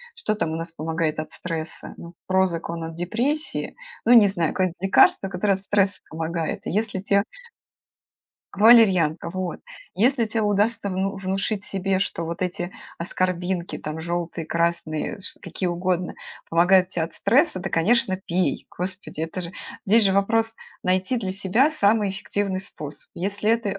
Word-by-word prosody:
Что 215 -13 -1
там 165 -5 -1
у - - -2
нас 165 +1 -4
помогает 160 0 -2
от 155 0 -5
стресса? 165 -2 -5
Ну, 170 0 -10
"Прозак" 185 -3 +1
он 165 0 -4
от 165 0 -5
депрессии. 240 - -2 0.3
Ну, 240 - +6
не 225 -4 +8
знаю, 170 -5 0
какое-нибудь 185 -2 0
лекарство, 195 0 +4
которое 195 +2 +1
от 190 - -2
стресса 200 0 +1
помогает. 165 0 -3
И - - -2
если 210 -1 -1
те 200 +1 +2 1.3
Валерьянка, 195 -8 +5
вот! 185 -1 -4 0.3
Если 235 +4 +3
те 220 0 -1
удастся 205 0 +1
вну 195 +2 -1
внушить 195 +2 -2
себе, 195 0 -1
что 170 -3 -2
вот 170 +2 -4
эти 175 0 -3 0.3
аскорбинки 180 0 -2
там, 155 +1 -5
жёлтые, 170 0 -3
красные, 170 +1 -1
ш - - -6
какие 185 - -3
угодно, 180 0 -1 0.4
помогают 180 +2 +5
те 180 - -3
от 165 - -4
стресса, 230 - +2
то 190 - -4
конечно 200 +4 +2
пей! 185 -1 -1
Господи, 185 -3 -4
это 165 +3 -4
же 170 0 -5 0.3
Здесь 215 +2 +5
же 195 - +4
вопрос- 225 +3 +2 0.3
найти 185 +6 +1
для 195 -6 -2
себя 205 +10 +2
самый 210 -7 +2
эффективный 195 -1 -2
способ. 150 -6 -7
Если 200 +4 -1
это 225 -4 0
185 Hz, 160 wpm, -24 LUFS, 170-205 Hz, 1.3 s, не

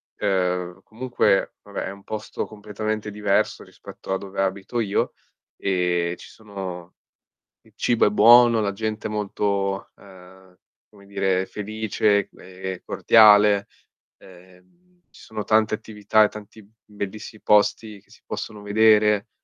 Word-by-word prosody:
ehm, 90 -2 -2
comunque 120 -3 0
vabbè 100 -1 -6
è - - -5
un 100 0 -14
posto 110 0 -5
completamente 105 0 -5
diverso 105 -1 0
rispetto 95 - -9
a - - 0
dove 95 0 -5
abito 95 +5 -2
io 105 -3 0 0.5
e 90 -2 0
ci - - -13
sono 95 -5 -9 0.7
il - - -25
cibo 120 -2 +1
è 105 - +3
buono, 115 +2 +6
la 100 -1 -1
gente 110 +1 -4
è - - -4
molto, 100 -2 -2
ehm, 95 -1 -17 0.3
come 100 -2 -19
dire 95 -1 -1
felice, 105 -1 -1
ehm, 95 0 -8
cordiale. 105 -2 +5 0.5
Ehm, 90 - -19 0.3
ci - - -17
sono 110 -1 -7
tante 110 0 +2
attività 110 0 +1
e - - +2
tanti 105 +1 -12
b 100 - -24 0.2
bellissi 105 +1 -7
posti 105 0 +2
che 100 - -35
si - - -20
possono 105 -2 -7
vedere. 105 0 +3
100 Hz, 135 wpm, -23 LUFS, 95-110 Hz, 0.7 s, buono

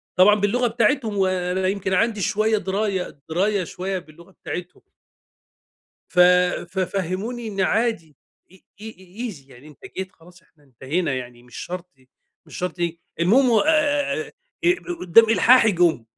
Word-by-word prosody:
طبعًا 205 +3 +6
باللغة 220 +5 +1
بتاعتهم، 230 -1 0
وأنا 185 0 0
يمكن 190 -1 -2
عندي 215 +1 +1
شوية 215 +3 +1
دراية 195 -4 -3
دراية 195 +3 0
شوية 185 +2 -4
باللغة 170 +2 -17
بتاعتهم. 180 -1 -8 1.3
ف 180 - -7 0.5
ففهموني 195 +5 -3
إن 195 -2 -4
عادي 190 - 0 0.4
إي 190 - -21 0.2
إي 220 +1 -7
إي 205 +5 -7
easy 140 -4 -16
يعني 130 +4 -15
أنت 150 - -17 0.2
جيت، 190 0 -5
خلاص 175 +1 -19
إحنا 150 -3 -30
انتهينا 140 +4 -3
يعني 120 -1 -7
مش 125 -1 -15
شرط 180 -4 -8
ي 130 0 -27 0.4
مش - - -11
شرط 180 -1 -4
ي 170 -1 -3 0.2
المهم 245 +9 +4
و 225 - +4
آآ، 295 -2 +2
آآ، - - -5 0.3
أب 355 +1 +1
قو 350 -1 -5
قدّام 225 +6 +5
إلحاحي 225 +1 +5
جُم، 170 -9 +2
190 Hz, 155 wpm, -22 LUFS, 170-220 Hz, 1.3 s, طبعًا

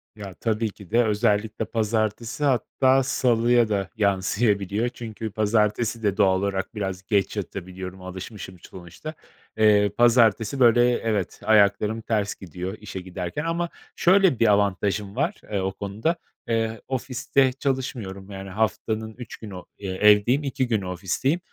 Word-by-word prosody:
Ya, 100 -3 -8
tabii 110 +1 -1
ki 100 -4 -15
de 120 +2 +4
özellikle 105 0 0
pazartesi, 110 +3 -1
hatta 130 0 +3
salıya 120 -3 +2
da 100 -3 -1
yansıyabiliyor 100 +1 +1
çünkü 110 -3 -7
pazartesi 110 +1 +1
de 100 -2 +1
doğal 95 -1 +4
olarak 100 +3 -2
biraz 95 -3 -4
geç 105 0 0
yatabiliyorum, 95 -1 -6
alışmışım 95 0 -8
sonuçta. 90 - -10 0.4
Eee, 105 -1 +5
pazartesi, 120 +1 +4
böyle, 120 -1 +6 0.2
evet, 105 -5 -2
ayaklarım 105 +1 +3
ters 105 -2 -1
gidiyor 95 +2 -6
işe 100 -3 -7
giderken 90 - -5
ama 170 +1 -1 0.3
şöyle 185 - +4
bir 115 - +4
avantajım 100 0 0
var, 165 +9 -1
eee, 100 - 0
o 95 0 -1
konuda, 105 - -2 0.3
eee, 115 -1 -1
ofiste 130 +1 +1
çalışmıyorum, 120 -8 -3
yani, 95 0 -7
haftanın 110 +2 -2
3 125 - -9
günü, 105 -4 -9 0.2
eee, 100 -1 -6
evdeyim, 105 +8 +4
2 135 -1 -1
günü 110 -5 0
ofisteyim. 95 - -1
105 Hz, 135 wpm, -24 LUFS, 100-120 Hz, 0.4 s, böyle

